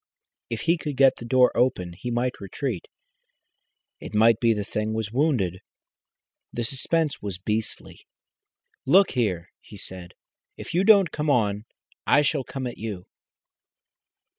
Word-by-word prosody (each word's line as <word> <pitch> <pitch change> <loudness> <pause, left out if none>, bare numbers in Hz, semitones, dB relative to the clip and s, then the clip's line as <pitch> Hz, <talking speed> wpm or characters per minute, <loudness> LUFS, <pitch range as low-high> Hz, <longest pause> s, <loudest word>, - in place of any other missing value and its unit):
If - - -4
he 170 0 +1
could 145 -4 -5
get 135 -1 +5
the 120 - -9
door 125 +1 +4
open 90 -9 +1
he 110 +8 -6
might 120 0 -2
retreat. 100 +1 -4 1.1
It - - -8
might 115 +1 +5
be 115 -1 +3
the 105 -2 -1
thing 110 +1 -3
was 110 -2 -3
wounded. 120 - 0 0.9
The 120 - -3
suspense 150 +5 -1
was 100 -3 -5
beastly. 105 +4 -4 0.8
"Look 190 +7 +5
here!" 95 -9 -1
he 105 - -14
said, 90 -2 -8 0.4
"if - - -8
you 180 +3 +2
don't 195 -6 +6
come 150 0 -2
on, 105 -5 +1 0.4
I 145 - +5
shall 145 -1 0
come 130 +1 -6
at 120 - -6
you." 105 -5 -5
120 Hz, 145 wpm, -25 LUFS, 105-140 Hz, 1.1 s, don't